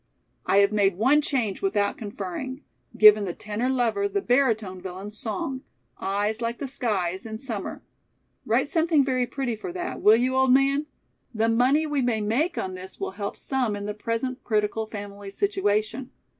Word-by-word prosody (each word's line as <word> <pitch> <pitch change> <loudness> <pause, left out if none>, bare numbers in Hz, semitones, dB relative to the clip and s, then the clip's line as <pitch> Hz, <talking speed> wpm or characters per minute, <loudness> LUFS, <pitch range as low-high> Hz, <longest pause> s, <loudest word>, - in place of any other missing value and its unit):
I - - +3
have 200 - +3
made 200 -3 +2
one 265 +8 +4
change 245 -9 -1
without 200 +1 +1
conferring; 215 - -6 0.3
given 215 -1 +8
the 175 - -4
tenor 215 +4 -2
lover 260 - +1
the 405 0 -1
baritone 225 - +1
villain's 190 +3 -7
song: 235 +5 -4 0.4
'Eyes 205 +3 -1
like 235 0 -2
the 280 - -4
skies 195 -8 -2
in 220 -1 -6
summer.' 225 -5 -5 0.6
Write - - +1
something 320 -5 +3
very 255 -2 0
pretty 250 -2 -2
for 350 - -6
that, 355 0 -4
will 215 +1 +7
you, 255 +3 +1
old 265 -1 +4
man? 275 +3 +3 0.5
The 225 +1 +2
money 255 +7 +3
we 295 -3 0
may 240 -3 +1
make 235 - 0
on 185 - -2
this 185 +1 -9
will - - -3
help 200 +1 -5
some 255 -6 -1
in 205 0 -5
the 210 - -3
present 230 +4 -3
critical 215 0 0
family 205 -1 -8
situation. 245 - -1
225 Hz, 170 wpm, -25 LUFS, 205-265 Hz, 0.6 s, given